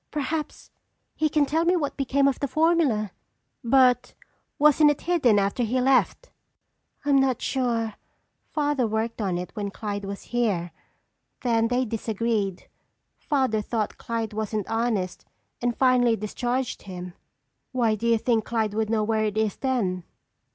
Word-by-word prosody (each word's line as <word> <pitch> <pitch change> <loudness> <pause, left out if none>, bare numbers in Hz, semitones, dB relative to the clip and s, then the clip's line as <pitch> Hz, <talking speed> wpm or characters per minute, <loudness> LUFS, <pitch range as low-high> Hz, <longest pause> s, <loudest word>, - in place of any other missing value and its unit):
"Perhaps 300 +1 -4 0.4
he 310 - 0
can 300 -1 +3
tell 320 +4 +1
me 350 +2 +3
what 295 -5 -1
became 275 0 +2
of 275 - 0
the 280 - -1
formula." 285 - +2 0.5
"But 250 0 +3 0.4
wasn't 300 +1 +5
it 295 - -1
hidden 300 -11 +3
after 200 +4 0
he 240 +2 +1
left?" 265 - +2 0.7
"I'm 285 -1 +4
not 265 -3 +2
sure. 235 -4 -1 0.6
Father 290 -5 0
worked 220 +1 -2
on 190 -4 -1
it 180 0 -5
when 205 -2 -3
Clyde 205 0 -5
was 200 0 -6
here. 200 -8 0 0.7
Then 230 -2 +2
they 250 +2 +1
disagreed. 220 -3 -2 0.5
Father 260 -7 0
thought 215 0 -3
Clyde 225 -2 -3
wasn't 215 -1 -3
honest 225 -5 -1 0.4
and 240 -1 -1
finally 250 -3 +4
discharged 240 +4 -3
him." 180 -2 -8 0.6
"Why 235 -4 +2
do 215 +2 -2
you 230 -1 +4
think 225 -1 +1
Clyde 220 -2 -1
would 220 0 -1
know 220 -1 +1
where 215 0 +1
it 210 0 -2
is 220 -2 +1
then?" 205 -10 -1
230 Hz, 150 wpm, -25 LUFS, 215-265 Hz, 0.7 s, wasn't